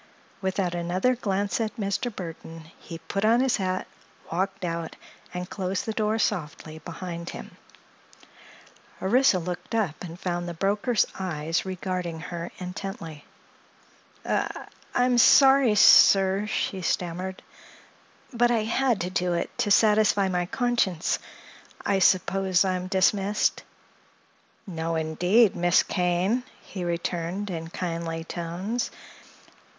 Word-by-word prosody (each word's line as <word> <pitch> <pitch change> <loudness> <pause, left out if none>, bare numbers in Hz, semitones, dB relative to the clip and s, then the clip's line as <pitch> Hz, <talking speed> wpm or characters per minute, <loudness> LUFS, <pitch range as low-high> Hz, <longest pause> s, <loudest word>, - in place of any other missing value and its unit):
Without 190 -2 -1
another 180 +8 0
glance 200 -2 -1
at 220 -1 -2
Mr. 205 +3 -2
Burthon 165 -3 -9
he 165 - -8
put 180 +5 -4
on 225 +2 +4
his 260 -1 +2
hat, 185 -1 -2 0.5
walked 185 +2 -2
out 165 -1 -4 0.4
and 180 0 -5
closed 190 -1 -3
the 220 - -2
door 215 0 0
softly 160 -6 -3
behind 170 +1 -7
him. - - -9 1.4
Orissa 235 +1 +3
looked 180 +5 -5
up 200 -9 -1
and 170 0 -8
found 175 -1 -3
the 170 - -6
broker's 205 +6 +1
eyes 165 -1 -2
regarding 180 -3 -4
her 170 0 -6
intently. 180 -4 -7 1.0
"I—I'm 245 0 -1
sorry, 270 -2 +6
sir," 195 0 +6
she 195 -3 -2
stammered; 180 +2 -3 0.9
"but 240 0 +3
I 230 -2 +1
had 235 0 +1
to 180 +1 -3
do 180 -1 0
it, 170 - -3
to 235 -4 +1
satisfy 210 -1 +4
my 180 -1 -1
conscience. 220 -8 0 0.7
I 195 -1 +2
suppose 190 0 +3
I 190 - +1
am 180 0 -3
dismissed?" 195 +2 +1 1.0
"No, 165 -3 -3
indeed, 180 +7 +3
Miss 175 +1 +3
Kane," 180 +6 0 0.2
he 185 - -7
returned 175 +3 -3
in 165 -1 -5
kindly 165 -1 -4
tones. 180 +8 -3
185 Hz, 120 wpm, -26 LUFS, 170-210 Hz, 1.4 s, sorry